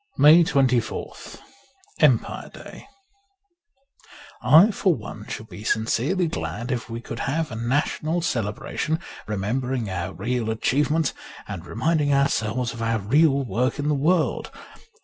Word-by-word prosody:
157 - - -17
MAY 140 -7 +4
24th - - -12 0.6
EMPIRE - - +2
DAY - - -12 1.6
IFOR 180 - +5
one 105 0 -9
should 110 - -6
be 105 - -10
sincerely 125 - 0
glad 90 - -4
if 120 -2 -3
we 115 0 -5
could 115 -1 -7
have 155 +1 -1
a - - -5
national 145 +7 -1
celebration, 130 +4 -2 0.3
remembering 115 +2 -2
our 90 0 -3
real 120 -2 -2
achievements 145 +7 +1 0.3
and - - -7
reminding 155 -3 0
ourselves 125 -4 +1
of 115 - -8
our 115 0 +1
real 140 +6 +3
work 125 +3 -1
in 145 +1 -1
the - - +3
world. 155 +4 +1
125 Hz, 130 wpm, -24 LUFS, 110-150 Hz, 1.6 s, IFOR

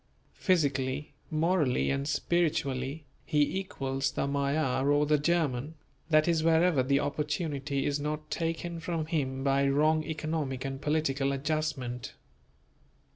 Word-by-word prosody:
Physically, 140 -6 0 0.2
morally 155 -5 +1
and 140 0 -1
spiritually, 150 -3 0 0.2
he 150 +5 +1
equals 135 -7 -2
the - - -1
Magyar 140 -1 0
or 145 +1 +3
the 150 0 +3
German; 150 -3 0 0.3
that 155 0 +4
is, 165 -2 +2
wherever 165 -2 +4
the 140 +2 +2
opportunity 145 -1 -2
is 145 0 0
not 150 +1 -4
taken 165 +1 -2
from 165 -1 -2
him 135 -5 -2
by 140 0 +3
wrong 155 +3 +3
economic 155 -4 -3
and 135 0 -4
political 145 -3 +1
adjustment. 140 -4 -2
150 Hz, 125 wpm, -29 LUFS, 135-160 Hz, 0.3 s, that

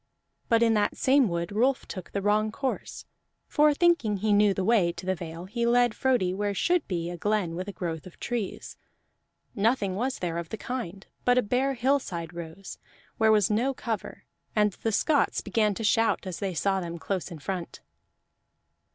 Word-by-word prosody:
But 230 0 +4
in 230 -1 +4
that 205 -1 +1
same 265 -3 +4
wood 170 +1 -2
Rolf 250 +6 +1
took 185 -2 -7
the 200 - -3
wrong 215 +1 +2
course; 265 +3 -4 0.4
for 300 0 +4
thinking 290 - +2
he 210 +2 +1
knew 205 0 +5
the 190 -1 -1
way 195 -5 +3
to 180 - -9
the 190 - +1
Vale 170 -1 -7
he 225 +5 -3
led 240 -1 +4
Frodi 240 -9 +1
where 205 +1 -1
should 350 - +1
be 170 -2 -2
a 175 - -6
glen 205 -3 0
with 185 +3 -4
a - - -4
growth 170 -3 -5
of 180 - -15
trees. 235 -5 -4 0.8
Nothing 205 -3 +1
was 255 +6 -1
there 170 -2 -2
of 170 -2 -6
the 220 - -5
kind, 205 -6 -5 0.2
but 245 0 +3
a 250 - +4
bare 260 +5 0
hillside 235 -10 -1
rose, 170 +3 -8 0.4
where 220 0 +5
was 210 -2 +4
no 250 +6 +1
cover, 225 -4 -5 0.3
and 210 -1 +3
the 225 - -2
Scots 290 +7 +2
began 210 -1 +1
to 225 - -5
shout 225 0 +2
as 185 -3 -5
they 190 -3 -3
saw 195 +3 +1
them 170 -1 -5
close 185 +2 -3
in 170 - -8
front. 175 +3 -5
205 Hz, 190 wpm, -27 LUFS, 185-235 Hz, 0.8 s, knew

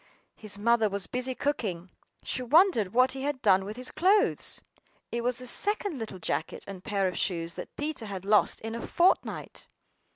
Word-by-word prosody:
His 210 -2 -7
mother 225 +1 +3
was 200 -1 -2
busy 255 +1 -2
cooking; 200 - -2 0.3
she 255 - -3
wondered 255 - +4
what 255 +3 +4
he 265 - -6
had 285 -1 -2
done 190 -3 +5
with 210 +3 -7
his 255 0 -3
clothes. 390 +6 +2 0.5
It 235 0 -2
was 245 0 0
the 255 - -9
second 405 - 0
little 220 -4 -6
jacket 175 - -3
and 190 -2 -9
pair 200 -2 0
of 180 - -3
shoes 170 -2 -1
that - - -8
Peter 295 -6 -3
had 195 -2 -6
lost 210 +1 +3
in 225 0 -5
a 235 - -4
fortnight! 350 +9 0
235 Hz, 185 wpm, -28 LUFS, 200-270 Hz, 0.5 s, done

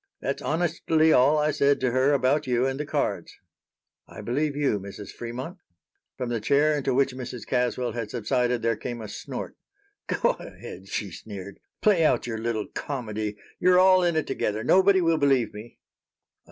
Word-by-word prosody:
That's - - -3
honestly 160 -1 +2
all 140 +5 +5
I 150 0 +2
said 140 -1 +2
to 130 -1 +1
her 130 +3 +3
about 135 +2 +2
you 125 0 +2
and 135 +1 -2
the 150 - -3
cards." - - -2 0.7
"I - - -10
believe 145 +4 -1
you, 140 -8 +1
Mrs. 100 +1 -9
Fremont." 130 +10 -7 0.6
From 125 -2 -3
the 115 -2 -2
chair 145 +6 +3
into 140 -3 -1
which 135 -1 +2
Mrs. 125 -3 -7
Caswell 125 0 0
had 115 -3 -4
subsided 120 +1 0
there 115 0 +2
came 120 +2 -6
a 110 - -7
snort. - - -7 0.5
"Go - - +2
ahead," 95 +2 -10
she 100 0 -3
sneered. 100 +1 -9 0.2
"Play 195 -6 +4
out 130 -6 +2
your 115 -2 -4
little 110 -2 -2
comedy. 110 -6 -4 0.2
You're 180 0 +5
all 185 0 +6
in 170 -2 +1
it 155 - +1
together. 110 -5 -2
Nobody 190 - +5
will 165 -2 +2
believe 135 -6 +2
me." 105 +3 -11
130 Hz, 175 wpm, -26 LUFS, 115-150 Hz, 0.7 s, all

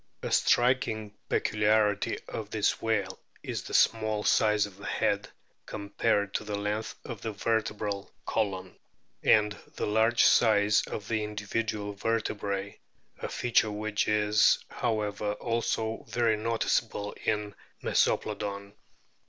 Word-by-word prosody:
A - - -3
striking 115 -4 +2 0.2
peculiarity 105 -1 +2
of 105 -2 -5
this 105 -1 0
whale 100 -4 -1 0.2
is - - -3
the - - -5
small 110 -1 +3
size 105 -1 +3
of 100 -2 -12
the 100 - -8
head - - 0 0.4
compared 100 -1 -1
to - - -1
the 105 -1 -3
length 105 +2 -3
of 115 -6 -7
the 110 - -3
verte 110 +1 -1
bral 100 -2 -3 0.2
column, 95 -4 -2 0.4
and 105 -1 +4 0.2
the - - -2
large 110 +3 +3
size 105 -2 +5
of 105 - -6
the 110 -2 0
individual 105 0 -3
vertebrae, 100 -2 -2 0.4
a - - -4
feature 120 -2 +2
which 105 0 -1
is, 105 0 +4
however, 105 -3 -1
also 115 0 -2
very 115 -2 +2
noticeable 110 -2 -1
in 105 -1 -1 0.3
Mesoplodon. 100 -1 0
105 Hz, 125 wpm, -29 LUFS, 105-110 Hz, 0.4 s, size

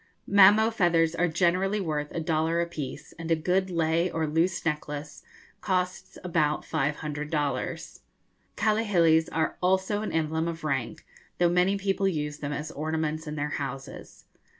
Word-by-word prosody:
Mamo 205 +3 +6
feathers 170 -5 +3
are 175 +1 +1
generally 185 +5 +1
worth 150 -5 -2
a - - -3
dollar 160 +1 0
a 170 - +1
piece, 155 -6 -7
and 165 0 -5
a 165 - +4
good 185 +4 0
lei 165 0 +1
or 160 -1 -1
loose 165 +4 0
necklace 150 -2 -4 0.4
costs 185 -1 -2
about 155 -4 0
five 145 +2 0
hundred 150 -1 -5
dollars. 145 -4 -2 0.6
Kahilis 185 -7 +3
are 160 -1 -1
also 190 +3 +1
an 215 - -3
emblem 160 0 0
of 165 -1 -5
rank, 135 -6 -2 0.3
though 175 -1 +3
many 180 +3 +2
people 195 0 0
use 150 -4 -2
them 145 0 -4
as 150 +2 -4
ornaments 155 +1 -2
in 150 - -4
their 150 0 -2
houses. 135 -2 -7
165 Hz, 155 wpm, -27 LUFS, 150-180 Hz, 0.6 s, Mamo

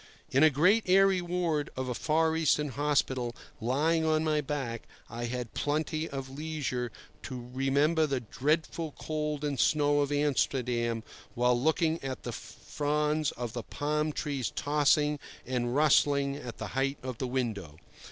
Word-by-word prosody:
In 135 - +3
a 155 - +8
great 180 - +4
airy 190 0 +5
ward 170 -4 -1
of 130 0 -2
a 125 - -1
Far 160 +4 +1
Eastern 150 -2 +2
hospital, 130 -3 0 0.2
lying 150 +8 +1
on 155 0 +2
my 155 -1 +1
back, 135 -5 -4 0.2
I 120 +1 -4
had 120 -1 -4
plenty 155 +2 -1
of 135 -1 -5
leisure 135 -4 -3 0.3
to 125 -1 -7
remember 145 +4 +2
the 135 -2 0
dreadful 155 +6 -1
cold 150 -1 -2
and 145 -3 -2
snow 145 +2 +3
of 145 0 +1
Amsterdam, 125 -5 0 0.3
while 125 +1 +3
looking 160 +5 +1
at 130 -1 -5
the - - -4
fronds 150 +1 -1
of 120 -2 -5
the 120 - -3
palm 150 +5 -1
trees 140 -5 -2
tossing 150 0 +2 0.3
and 125 -1 -1
rustling 140 -2 +3
at 125 -5 -7
the - - -5
height 135 +1 0
of 130 -3 -5
the 130 - -1
window. 110 - -3
145 Hz, 150 wpm, -30 LUFS, 125-155 Hz, 0.3 s, a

